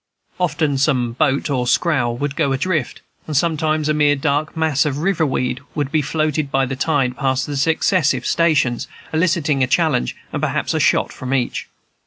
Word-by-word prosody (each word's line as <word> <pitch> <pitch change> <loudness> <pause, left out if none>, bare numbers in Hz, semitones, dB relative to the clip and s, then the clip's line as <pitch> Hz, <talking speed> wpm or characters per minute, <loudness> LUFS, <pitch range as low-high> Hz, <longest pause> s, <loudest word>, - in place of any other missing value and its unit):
Often 155 -5 0
some 130 -4 +1
boat 140 +2 0
or 125 -3 0
scow 145 -5 +2
would 140 +4 -3
go 140 -3 +1
adrift, 150 0 -2 0.3
and 155 -3 -1
sometimes 155 -1 +1
a 155 - +2
mere 150 -1 +3
dark 145 +3 -1
mass 155 -4 +2
of 145 -2 -2
river 165 0 +1
weed 125 -1 -1 0.2
would 145 -2 -2
be 155 - +2
floated 155 0 -1
by 135 -1 +1
the 130 +1 -4
tide 130 -2 0
past 130 -1 0
the 145 - -5
successive 160 +3 +1
stations, 150 -8 +1 0.3
eliciting 160 -4 +1
a 130 - +3
challenge 150 - +1 0.2
and - - -2
perhaps - - -1
a - - 0
shot - - +2
from 130 +1 -3
each. 125 -2 -2
145 Hz, 180 wpm, -19 LUFS, 135-155 Hz, 0.3 s, mere